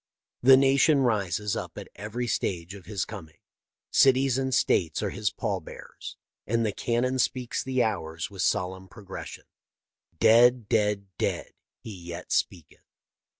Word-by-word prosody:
The 130 +1 +8
nation 135 +2 +4
rises 105 -4 0
up - - -6
at - - -7
every 110 +4 -4
stage 90 -6 -2
of 100 -3 -12
his 105 -2 -2
coming. 80 -8 -10 0.5
Cities 135 -1 +4
and 130 0 -1
states 85 -9 +1
are - - -1
his - - -1
pall - - -3
bearers, - - -10 0.3
and 115 +1 +1
the 105 - 0
cannon 125 +5 -1
speaks 125 0 -1
the 130 -1 +1
hours 85 -6 -3
with 95 -2 -6
solemn 95 -1 -1
progression. 95 0 -9 0.7
Dead, 120 0 +5
dead, 105 -2 +1
dead, - - -2 0.3
he 110 - -9
yet 85 0 -9
speaketh. 85 -4 -2
105 Hz, 145 wpm, -27 LUFS, 95-125 Hz, 0.7 s, The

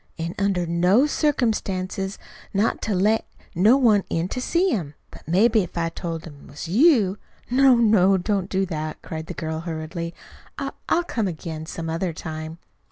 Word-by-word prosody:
An' 165 +1 -3
under 195 -3 +1
no 180 - +3
circumstances 200 - -1 0.4
not 205 +3 +1
to 215 - -1
let 210 +4 +2 0.3
no 210 +9 +5
one 220 -7 +4
in 165 +1 -1
to 255 - -3
see 350 +7 +1
him. 155 - -3 0.2
But - - -14
maybe 215 +6 +4
if 175 -2 -6
I 165 -1 0
told 165 -1 -5
him't 145 -4 -12
was 145 +4 -7
you 215 - +4
" - - -33
"No, 265 0 +6
no, 210 -5 +4
don't 175 - -5
don't 200 -2 0
do 190 0 +1
that!" 155 -3 -4
cried 160 0 -6
the - - -6
girl 160 -1 -3
hurriedly. 165 +1 -5 0.4
"I - - -3 0.2
I'll 345 - +3
come 225 - -2
again 160 -2 -6
some 165 0 -5
other 165 +2 -2
time." 155 0 -6
185 Hz, 180 wpm, -23 LUFS, 165-220 Hz, 0.4 s, No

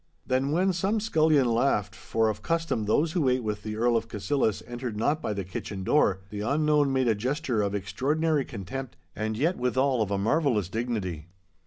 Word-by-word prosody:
Then 130 +2 +1
when 185 +4 +2
some 195 +5 0
scullion 155 - +3
laughed, 120 +3 +1
for 115 0 0
of 110 - -2
custom 165 -9 -1
those 150 +10 +2
who 155 -6 +2
ate 125 -1 +1
with 105 -1 -3
the 105 0 -5
Earl 120 +2 +2
of 115 0 0
Cassillis 110 +1 -1
entered 120 -2 -5
not 145 +8 +1
by - - -2
the 100 -1 -2
kitchen 95 +1 -6
door, 95 -5 +2
the 105 -1 -4
unknown 150 +3 +2
made 130 -1 +1
a 115 - +4
gesture 125 +1 -1
of 100 0 -1
extraordinary 145 - 0
contempt 125 +3 -7 0.2
and 110 0 -2
yet 165 +8 +1
withal 130 0 +1
of 105 - 0
a 100 - 0
marvellous 110 - +1
dignity. 100 -9 -3
125 Hz, 190 wpm, -27 LUFS, 105-150 Hz, 0.2 s, a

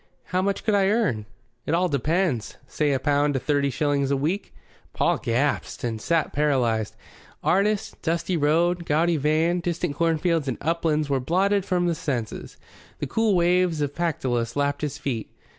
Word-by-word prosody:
"How 185 0 -1
much 195 +1 -1
could 215 - +1
I 195 -1 +3
earn?" 190 - 0 0.4
"It 160 - +2
all 180 +2 +2
depends. 150 - 0
Say 150 -2 0
a 135 - +2
pound 145 +1 +1
to - - +1
thirty 145 0 +1
shillings 140 0 0
a 140 - +2
week." 170 +9 -2 0.4
Paul - - +1
gasped 135 +5 -1
and 115 -2 -2
sat 165 +3 0
paralyzed. 120 -7 +1 0.5
Artist, 200 +3 +1
dusty 170 +2 -1
road, 170 +3 +2
gaudy 165 +2 +2
van, 155 +4 +2
distant 170 -2 -2
cornfields 165 -1 +1
and 130 - -2
uplands 160 -1 0
were 140 -2 +1
blotted 190 +8 +1
from 180 -1 +1
his 170 -2 -1
senses. 125 -10 -4 0.4
The - - -3
cool 215 +8 +1
waves 175 -1 +2
of 145 -1 -1
Pactolus 130 -9 -1
lapped 145 0 0
his 150 -1 -3
feet. 130 -7 -3
155 Hz, 165 wpm, -24 LUFS, 140-175 Hz, 0.5 s, I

